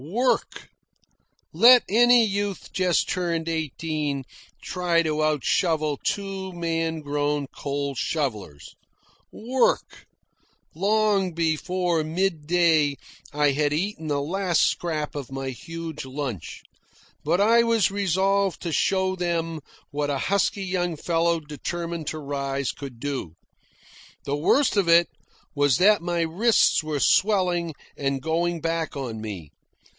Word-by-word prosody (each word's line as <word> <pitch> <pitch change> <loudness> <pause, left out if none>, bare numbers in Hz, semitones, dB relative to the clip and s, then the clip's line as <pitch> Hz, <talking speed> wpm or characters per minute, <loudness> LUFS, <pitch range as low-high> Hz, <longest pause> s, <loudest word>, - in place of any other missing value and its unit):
Work! 235 - -1 0.8
Let 240 +8 +7
any 240 +2 +5
youth 200 -1 -3
just 185 -2 +1
turned 170 -2 -2
eighteen 155 -3 -2 0.4
try 175 -2 +1
to 155 -1 0
out 155 -3 0
shovel 155 -5 +1
two 195 -1 -3
man 165 -2 -2
grown 145 0 -1
coal 140 0 -4
shovellers. 115 - -3 0.6
Work! 250 +3 -1 0.7
Long 200 0 +1
before 170 +1 0
midday 160 -3 +1 0.4
I 150 -1 +2
had 145 +1 0
eaten 165 0 -2
the 145 -1 0
last 180 +3 +1
scrap 155 -3 -1
of 140 -3 -6
my 135 0 -4
huge 165 +3 -7
lunch. 130 - -6 0.6
But 165 +5 +1
I 230 +3 +5
was 230 -4 +2
resolved 195 0 +1
to 170 - -3
show 190 +2 +1
them 165 -2 -2 0.3
what 145 0 -2
a 140 - 0
husky 200 - 0
young 175 -2 -1
fellow 170 +1 +1
determined 165 +2 -5
to 155 - -3
rise 140 -2 -3
could 135 -5 -9
do. 130 - -4 0.9
The 140 - -1
worst 210 - +2
of 190 -4 +2
it 170 0 +5 0.4
was 145 -3 +3
that 205 0 +5
my 175 0 -1
wrists 180 +3 +3
were 155 -2 -2
swelling 180 -4 +2 0.2
and 135 -1 -1
going 170 +2 -1
back 165 -1 -2
on 120 -5 -5
me. 95 -9 -7
165 Hz, 125 wpm, -24 LUFS, 145-185 Hz, 0.9 s, Let